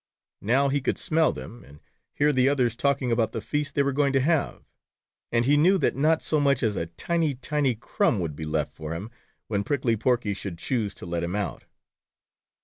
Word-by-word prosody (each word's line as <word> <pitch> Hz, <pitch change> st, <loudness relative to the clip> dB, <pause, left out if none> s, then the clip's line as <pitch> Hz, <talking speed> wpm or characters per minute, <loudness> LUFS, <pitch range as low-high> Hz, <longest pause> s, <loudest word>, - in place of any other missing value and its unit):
Now, 130 Hz, +7 st, +2 dB
he 140 Hz, +1 st, 0 dB
could -, -, -1 dB
smell 160 Hz, 0 st, +2 dB
them, 120 Hz, +1 st, -9 dB
and 70 Hz, +2 st, -16 dB, 0.4 s
hear 150 Hz, +1 st, +3 dB
the 130 Hz, 0 st, +4 dB
others 125 Hz, -5 st, +1 dB
talking 135 Hz, -1 st, 0 dB
about 115 Hz, -1 st, +1 dB
the -, -, -2 dB
feast 150 Hz, -1 st, -3 dB
they 140 Hz, -, +3 dB
were 140 Hz, -, +1 dB
going 140 Hz, 0 st, +2 dB
to 135 Hz, -, +4 dB
have, 155 Hz, +3 st, 0 dB, 0.7 s
and 115 Hz, 0 st, +2 dB
he 145 Hz, +3 st, +4 dB
knew 175 Hz, +7 st, +5 dB
that 165 Hz, -, +1 dB
not 155 Hz, +4 st, +2 dB
so 155 Hz, -, +1 dB
much 140 Hz, -3 st, +2 dB
as 110 Hz, -3 st, +1 dB
a 85 Hz, -, -2 dB
tiny, 160 Hz, -, -1 dB
tiny 135 Hz, 0 st, 0 dB
crumb 110 Hz, -1 st, 0 dB
would 80 Hz, -5 st, -3 dB
be 80 Hz, +2 st, -6 dB
left 75 Hz, -1 st, -2 dB
for 80 Hz, +1 st, -6 dB
him, 100 Hz, +7 st, -7 dB, 0.3 s
when 100 Hz, -2 st, -1 dB
Prickly 125 Hz, -1 st, 0 dB
Porky 115 Hz, -2 st, 0 dB
should 95 Hz, -3 st, -6 dB
choose 105 Hz, 0 st, -2 dB
to -, -, -10 dB
let 85 Hz, -1 st, -2 dB
him 85 Hz, +3 st, -2 dB
out. 105 Hz, -3 st, -3 dB
125 Hz, 210 wpm, -26 LUFS, 100-145 Hz, 0.7 s, knew